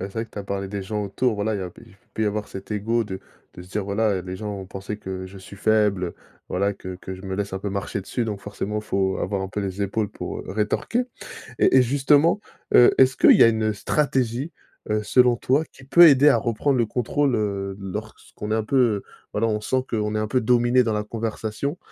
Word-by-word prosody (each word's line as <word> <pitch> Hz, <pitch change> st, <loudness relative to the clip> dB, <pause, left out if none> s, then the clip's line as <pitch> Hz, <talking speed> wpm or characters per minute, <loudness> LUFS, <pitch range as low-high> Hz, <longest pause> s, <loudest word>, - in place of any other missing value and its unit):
c'est 95 Hz, -, -4 dB
vrai 115 Hz, 0 st, -2 dB
que -, -, -32 dB
tu -, -, -8 dB
as -, -, -3 dB
parlé 100 Hz, 0 st, -3 dB
des 100 Hz, 0 st, -4 dB
gens 105 Hz, +2 st, -3 dB
autour, 110 Hz, +5 st, 0 dB
voilà. 105 Hz, +1 st, -1 dB
Il 100 Hz, -, -3 dB
y -, -, -3 dB
a 90 Hz, -, -5 dB
p -, -, -17 dB
il 110 Hz, -4 st, -19 dB, 0.2 s
peut 110 Hz, -, -2 dB
y -, -, +1 dB
avoir 105 Hz, 0 st, -2 dB
cet 95 Hz, +2 st, -9 dB
ego 115 Hz, +3 st, 0 dB
de 95 Hz, -2 st, -6 dB, 0.3 s
de 90 Hz, -, -9 dB
se 90 Hz, -, -16 dB
dire: 105 Hz, +2 st, -1 dB
«Voilà, 105 Hz, +2 st, +1 dB
heu, -, -, -2 dB
les 90 Hz, 0 st, -6 dB
gens 105 Hz, +1 st, -5 dB
vont 95 Hz, -1 st, -7 dB
penser 100 Hz, +3 st, -6 dB
que 95 Hz, -2 st, -6 dB
je 95 Hz, +1 st, -10 dB
suis 95 Hz, +1 st, -12 dB
faible, 105 Hz, -2 st, +2 dB
heu, 85 Hz, -, -5 dB, 0.4 s
voilà, 100 Hz, +2 st, 0 dB
que 95 Hz, -1 st, -8 dB
que 95 Hz, +1 st, -7 dB
je 95 Hz, -, -12 dB
me 95 Hz, -1 st, -4 dB
laisse 100 Hz, 0 st, -3 dB
un -, -, -2 dB
peu 100 Hz, +1 st, -4 dB
marcher 100 Hz, 0 st, -3 dB
dessus 115 Hz, +4 st, -3 dB
donc, 105 Hz, -2 st, -3 dB
forcément, 105 Hz, +1 st, -4 dB
faut 95 Hz, -2 st, 0 dB
avoir 100 Hz, +1 st, -2 dB
un 95 Hz, -, -3 dB
peu 105 Hz, +1 st, -4 dB
les 95 Hz, 0 st, -4 dB
épaules 100 Hz, +1 st, -1 dB
pour, -, -, -6 dB
heu, -, -, -11 dB
rétorquer». 110 Hz, -, 0 dB, 0.6 s
Et -, -, +4 dB
et 130 Hz, -, +7 dB
justement, 145 Hz, -, +3 dB, 0.3 s
heu, 120 Hz, -, +7 dB
est-ce 130 Hz, 0 st, +5 dB
qu'il -, -, +7 dB
y -, -, +7 dB
a 115 Hz, -, +7 dB
une, 110 Hz, -1 st, -1 dB
heu, -, -, -4 dB
stratégie, 130 Hz, +4 st, -1 dB, 0.4 s
heu, 105 Hz, 0 st, 0 dB
selon 125 Hz, +2 st, +4 dB
toi, 140 Hz, +6 st, +1 dB
qui 130 Hz, -, -15 dB
peut 170 Hz, +6 st, +8 dB
aider 145 Hz, 0 st, +6 dB
à 135 Hz, -, +4 dB
reprendre 115 Hz, +4 st, 0 dB
le 120 Hz, -, +2 dB
contrôle, 125 Hz, +4 st, 0 dB
heu, 100 Hz, -2 st, -2 dB
lorsqu'on 105 Hz, +2 st, -7 dB
est -, -, +2 dB
un 110 Hz, -, 0 dB
peu, 115 Hz, -3 st, +2 dB, 0.3 s
voilà, 115 Hz, +2 st, +1 dB
on 105 Hz, -1 st, 0 dB
sent 130 Hz, +4 st, 0 dB
qu'on 105 Hz, -1 st, -1 dB
est -, -, +1 dB
un 110 Hz, -, -1 dB
peu 130 Hz, -, +2 dB
dominé 120 Hz, +1 st, +3 dB
dans 115 Hz, -2 st, -1 dB
la 105 Hz, 0 st, -1 dB
conversation? 110 Hz, +6 st, -4 dB
105 Hz, 255 wpm, -23 LUFS, 100-120 Hz, 0.6 s, peut